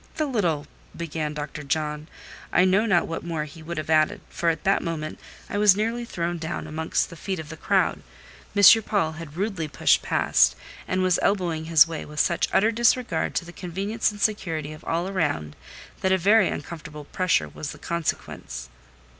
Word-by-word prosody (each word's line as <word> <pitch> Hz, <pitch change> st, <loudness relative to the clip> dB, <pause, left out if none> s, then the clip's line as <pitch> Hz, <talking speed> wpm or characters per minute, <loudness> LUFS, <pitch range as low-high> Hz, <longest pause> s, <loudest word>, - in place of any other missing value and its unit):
"The 310 Hz, -, 0 dB
little—" 175 Hz, -, 0 dB, 0.3 s
began 155 Hz, -2 st, -3 dB
Dr. 150 Hz, 0 st, -5 dB
John: 150 Hz, +1 st, -2 dB, 0.4 s
I 180 Hz, -, +4 dB
know 195 Hz, +4 st, +3 dB
not 180 Hz, -5 st, +3 dB
what 165 Hz, -, -4 dB
more 165 Hz, -3 st, -2 dB
he 155 Hz, +2 st, -12 dB
would 170 Hz, +1 st, -6 dB
have 155 Hz, +1 st, -3 dB
added, 160 Hz, +6 st, +3 dB
for 170 Hz, -, 0 dB
at 165 Hz, -, -2 dB
that 195 Hz, 0 st, +2 dB
moment 155 Hz, -2 st, -4 dB, 0.3 s
I 205 Hz, -, -2 dB
was 205 Hz, -2 st, +6 dB
nearly 230 Hz, +3 st, -1 dB
thrown 170 Hz, -5 st, -3 dB
down 160 Hz, 0 st, -4 dB
amongst 160 Hz, +3 st, -1 dB
the -, -, -9 dB
feet 190 Hz, +3 st, -4 dB
of 160 Hz, -2 st, -7 dB
the 160 Hz, -, -7 dB
crowd. -, -, +1 dB, 0.5 s
M. 205 Hz, +2 st, +8 dB
Paul 195 Hz, -8 st, 0 dB
had 160 Hz, -1 st, -9 dB
rudely 190 Hz, -5 st, -2 dB
pushed 145 Hz, -, +3 dB
past, -, -, +3 dB, 0.3 s
and 185 Hz, 0 st, 0 dB
was 185 Hz, -1 st, +3 dB
elbowing 175 Hz, -5 st, 0 dB
his 165 Hz, 0 st, +6 dB
way 165 Hz, -2 st, -5 dB
with 150 Hz, 0 st, -7 dB
such 170 Hz, -, +2 dB
utter 220 Hz, +3 st, +3 dB
disregard 230 Hz, -6 st, +1 dB
to -, -, -1 dB
the 175 Hz, -, -11 dB
convenience 195 Hz, +6 st, -2 dB
and 205 Hz, -, -11 dB
security 165 Hz, -8 st, -1 dB
of 155 Hz, -, -13 dB
all 170 Hz, +2 st, -1 dB
around, 145 Hz, -, -1 dB, 0.4 s
that 190 Hz, -, +1 dB
a 190 Hz, -, +4 dB
very 205 Hz, +3 st, +4 dB
uncomfortable 150 Hz, -1 st, -6 dB
pressure 170 Hz, -, +1 dB
was 140 Hz, -, -6 dB
the -, -, -10 dB
consequence. 65 Hz, -, -4 dB
170 Hz, 190 wpm, -25 LUFS, 155-195 Hz, 0.5 s, M